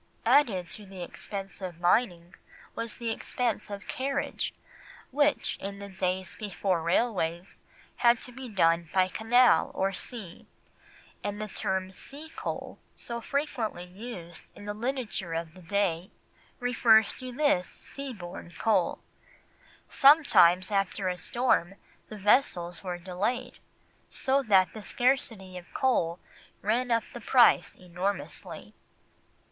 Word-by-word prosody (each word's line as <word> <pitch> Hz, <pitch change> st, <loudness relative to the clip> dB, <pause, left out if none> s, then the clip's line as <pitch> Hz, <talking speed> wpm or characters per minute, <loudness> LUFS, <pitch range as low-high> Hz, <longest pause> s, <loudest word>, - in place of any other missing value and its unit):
Added 195 Hz, -12 st, +3 dB
to 210 Hz, -2 st, -9 dB
the 190 Hz, -2 st, -7 dB
expense 195 Hz, +2 st, -6 dB
of 180 Hz, -3 st, -6 dB
mining 175 Hz, -2 st, +1 dB, 0.4 s
was 230 Hz, -1 st, -4 dB
the 235 Hz, -2 st, -2 dB
expense 235 Hz, 0 st, -2 dB
of 200 Hz, 0 st, -7 dB
carriage, 275 Hz, +2 st, -2 dB, 0.6 s
which, 290 Hz, +2 st, +1 dB
in 200 Hz, 0 st, -6 dB
the 200 Hz, 0 st, -8 dB
days 185 Hz, 0 st, -2 dB
before 195 Hz, -4 st, -1 dB
railways, 175 Hz, -1 st, 0 dB, 0.4 s
had 235 Hz, -1 st, +4 dB
to 250 Hz, -, -7 dB
be 255 Hz, 0 st, -8 dB
done 165 Hz, -4 st, +2 dB
by 185 Hz, -1 st, +5 dB
canal 240 Hz, +6 st, +4 dB
or 195 Hz, +1 st, 0 dB
sea, 195 Hz, -3 st, -7 dB, 0.8 s
and 205 Hz, 0 st, -3 dB
the 215 Hz, -, -3 dB
term 190 Hz, -1 st, -2 dB
sea 290 Hz, +11 st, -10 dB
coal -, -, -5 dB, 0.2 s
so 235 Hz, -1 st, -5 dB
frequently 240 Hz, -9 st, -2 dB
used 180 Hz, -3 st, -8 dB
in 205 Hz, -, -11 dB
the 205 Hz, -, -3 dB
literature 225 Hz, -7 st, -3 dB
of 165 Hz, -1 st, -4 dB
the 185 Hz, -, -14 dB
day 180 Hz, -1 st, 0 dB, 0.5 s
refers 235 Hz, -3 st, +4 dB
to 255 Hz, -1 st, -7 dB
this 245 Hz, -9 st, +2 dB
sea 275 Hz, -1 st, -7 dB
borne 175 Hz, -5 st, -9 dB
coal. 225 Hz, -, +2 dB, 0.9 s
Sometimes 200 Hz, -, +6 dB
after 195 Hz, -1 st, 0 dB
a 180 Hz, -, -1 dB
storm 215 Hz, -5 st, +1 dB, 0.3 s
the 215 Hz, -, -7 dB
vessels 195 Hz, -5 st, +2 dB
were 180 Hz, -2 st, -3 dB
delayed, 185 Hz, +7 st, -3 dB, 0.5 s
so 270 Hz, +1 st, +1 dB
that 190 Hz, -7 st, +4 dB
the 220 Hz, -, -7 dB
scarcity 220 Hz, -6 st, 0 dB
of 175 Hz, -, -18 dB
coal 175 Hz, -11 st, +1 dB, 0.5 s
ran 235 Hz, +5 st, +1 dB
up 230 Hz, -1 st, +2 dB
the 240 Hz, -, -7 dB
price 245 Hz, +1 st, +5 dB
enormously. 180 Hz, +2 st, -5 dB
200 Hz, 130 wpm, -28 LUFS, 180-245 Hz, 0.9 s, Sometimes